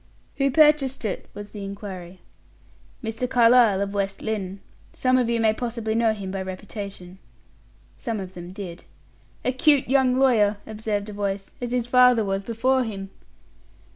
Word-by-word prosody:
"Who 275 0 +2
purchased 295 -4 +3
it?" 210 - -4
was 205 0 -8
the 205 -2 -7
inquiry. 190 -3 -8 0.8
"Mr. 225 +3 -3
Carlyle, 235 -5 +5
of 200 0 -2
West 195 -1 -2
Lynne. 200 -3 -3 0.3
Some 255 0 +2
of 240 -2 +1
you 235 -1 +1
may 220 -1 +3
possibly 230 -2 -3
know 225 0 +3
him 200 -3 -5
by 195 0 -3
reputation." 190 -1 -7 0.8
Some 230 -4 -3
of 190 -1 -7
them 175 0 -9
did. 185 -3 -8 0.6
"A - - +3
cute 280 +1 +3
young 260 -1 +3
lawyer," 220 -6 +4
observed 215 -1 -3
a - - -7
voice; 200 -1 -3
"as 245 -1 -3
his 245 -2 0
father 250 -2 +5
was 195 0 -1
before 255 +4 +1
him." 195 -4 -6
220 Hz, 160 wpm, -24 LUFS, 195-245 Hz, 0.8 s, Carlyle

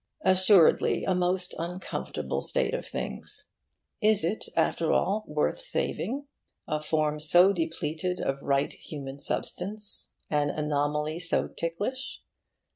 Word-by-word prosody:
Assuredly, 185 -2 +5
a 190 - +1
most 180 0 0
uncomfortable 180 +3 -4
state - - 0
of - - -3
things. - - -4 0.6
Is 210 -5 +4
it, 205 +6 -2
after 165 - +2
all, 210 +3 +1
worth 150 - -1
saving? 285 - -2 0.4
a 150 0 -1
form 150 -1 0
so 175 +6 +6
depleted 165 +1 -2
of 135 0 -2
right 140 0 +1
human 140 -2 -8
substance, 205 +7 +1
an 145 -1 +1
anomaly 150 +1 -1
so 170 0 +1
ticklish. 205 +11 -4
170 Hz, 120 wpm, -28 LUFS, 150-190 Hz, 0.6 s, so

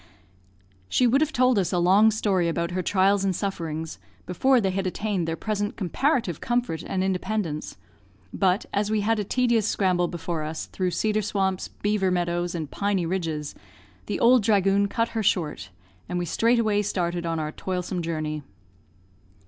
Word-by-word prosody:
She 250 - +3
would 260 +4 +3
have 310 0 +1
told 255 -4 +3
us 185 - 0
a 180 - 0
long 190 +5 +5
story 200 -5 +1
about 170 +1 -2
her 185 +1 -1
trials 195 +1 +2
and 190 -2 +1
sufferings, 165 -5 -4 0.3
before 255 +9 +3
they 195 -4 0
had 190 0 -1
attained 190 -2 -2
their 165 - -1
present 205 +2 -2
comparative 225 - 0
comfort 240 -9 -1
and 185 -1 -2
independence, 190 -4 -2 0.6
but, 190 +2 +1
as 205 +1 0
we 215 -1 +1
had 220 +1 +1
a - - 0
tedious 235 0 +1
scramble 180 -3 +1
before 170 -2 -4
us, 155 +1 -4
through 185 -1 -2
cedar 215 +5 0
swamps, 190 -2 -1
beaver 205 -2 -1
meadows, 175 -1 -1
and 155 -4 -4
piny 200 -3 0
ridges, 165 -4 -3 0.5
the - - -2
"ould 245 +1 +6
dhragoon" 200 -1 +3
cut 230 0 0
her 225 - -2
short, 150 - 0 0.4
and 180 - -2
we 175 - -1
straightway 225 +1 +2
started 175 -4 -2
on 165 0 -1
our 155 -1 -3
toilsome 180 +1 -3
journey. 155 -2 -3
190 Hz, 165 wpm, -25 LUFS, 175-215 Hz, 0.6 s, ould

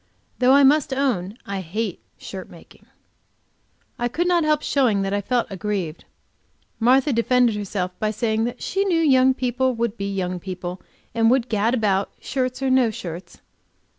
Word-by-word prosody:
Though 255 +1 +5
I 280 0 +6
must 290 +1 +4
own 225 -7 -1
I 200 -1 -4
hate 190 +3 -3 0.2
shirt - - -8
making. - - -17 1.1
I 240 - +1
could 340 +9 -1
not 350 -2 +3
help 305 -1 +1
showing 230 -8 +2
that 195 0 -2
I 205 - 0
felt 240 +3 0
aggrieved. 190 -4 -4 0.7
Martha 260 +4 +3
defended 235 0 +3
herself 195 -3 -3
by 215 - 0
saying 220 +1 0
that 245 +1 -5
she 390 +1 0
knew 360 -4 +1
young 265 -4 +4
people 255 0 0
would 235 -1 -2
be 200 0 -3
young 180 -2 -2
people, 180 0 -6 0.3
and 225 0 +3
would 250 -1 +2
gad 220 +3 +1
about, 200 -4 0
shirts 255 0 -3
or 265 - +1
no 255 -3 +4
shirts. 175 -4 -8
230 Hz, 165 wpm, -22 LUFS, 200-260 Hz, 1.1 s, I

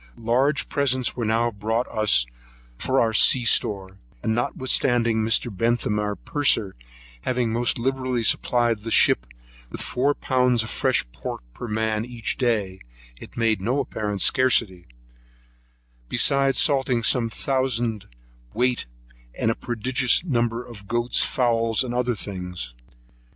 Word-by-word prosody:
Large 130 +6 +1
presents 130 -3 0
were 120 - -2
now 115 +2 +1
brought 110 +3 -2
us 105 - +3 0.5
for 130 - 0
our 115 -1 +2
sea 120 +3 +4
store; 95 -4 0 0.2
and 110 - 0
notwithstanding 120 -1 +1
Mr. 110 0 +1
Bentham 115 -1 0
our 105 0 -2
purser 120 -10 0 0.5
having 125 - -1
most 120 +1 0
liberally 130 -1 -1
supplied 120 0 +2
the 110 +2 -7
ship - - +3 0.4
with - - -8
four 140 +3 0
pounds 125 -3 +1
of 110 - -7
fresh - - +1
pork - - -7
per 120 - -7
man 110 0 -1
each 120 -2 -5
day, 105 -7 0 0.4
it - - -13
made 115 -3 +1
no 125 +8 0
apparent 105 -6 -3
scarcity; 110 -8 +2 1.2
beside 140 -1 +3
salting 130 -5 +1
some 115 +1 +3
thousand 120 -4 -1 0.5
weight, 125 - 0 0.5
and 115 - +1
a - - -2
prodigious 125 +4 +1
number 120 -6 -1
of 100 -4 -12
goats, 120 +2 +1
fowls, 115 -3 +1
and 120 -2 -5
other 125 -1 0
things. 90 - -6
115 Hz, 135 wpm, -23 LUFS, 110-125 Hz, 1.2 s, sea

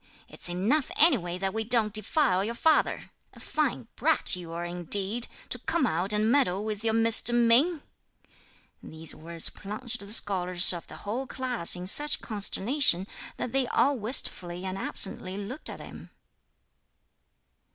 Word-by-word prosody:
It's - - -12
enough 215 - 0
anyway 210 - +2
that 190 +1 -3
we 220 0 -2
don't 220 -2 0
defile 215 - 0
your 230 +3 -4
father! 315 +5 0 0.2
A - - -16
fine - - -3
brat - - +1
you 175 -2 -9
are 170 +1 -5
indeed, 190 +6 -3 0.2
to 250 - -4
come 320 +3 -1
out 185 -1 -1
and 210 +2 +1
meddle 215 -8 +1
with 215 0 -5
your 225 -1 0
Mr. 230 +1 +3
Ming!" 250 +8 +3 1.0
These 160 0 -4
words 165 +1 -2
plunged 215 +4 -5
the 200 0 -6
scholars 180 -4 +5
of 170 - -8
the - - -11
whole 245 +6 -4
class 250 -10 0
in 180 0 -7
such 295 +10 +3
consternation 210 - +3 0.3
that 245 - -5
they 270 -1 0
all 280 +3 +1
wistfully 190 -6 0
and 185 0 -4
absently 190 -1 -4
looked 210 +9 -6
at - - -9
him. - - -12
210 Hz, 150 wpm, -27 LUFS, 180-245 Hz, 1.0 s, scholars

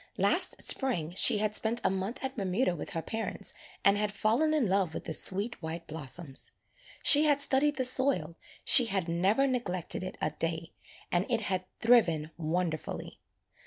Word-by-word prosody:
Last - - +2
Spring 175 - +1
she 210 - +3
had 210 0 0
spent 225 +2 +2
a - - +1
month 195 +8 -5
at 265 0 -4
Bermuda 190 -1 -1
with 175 - -6
her 165 -2 -4
parents 225 0 -4 0.3
and 200 +1 +4
had 210 0 -1
fallen 225 +10 0
in 300 -7 0
love 190 -4 -1
with - - -6
the 160 - -5
sweet 200 +8 +1
white 165 +1 -6
blossoms. 150 -1 -7 0.5
She 300 +1 +8
had 290 -2 +4
studied 285 +1 +3
the 260 - -2
soil, 255 - +2 0.3
she 250 - +8
had 195 -5 -1
never 190 +10 +1
neglected 195 - -3
it 185 - -8
a - - -2
day, 165 +2 -5 0.4
and 175 +3 0
it 230 -2 0
had 185 -3 -1
thriven 170 -10 +2
wonderfully. 165 -1 -4
195 Hz, 170 wpm, -29 LUFS, 170-245 Hz, 0.5 s, She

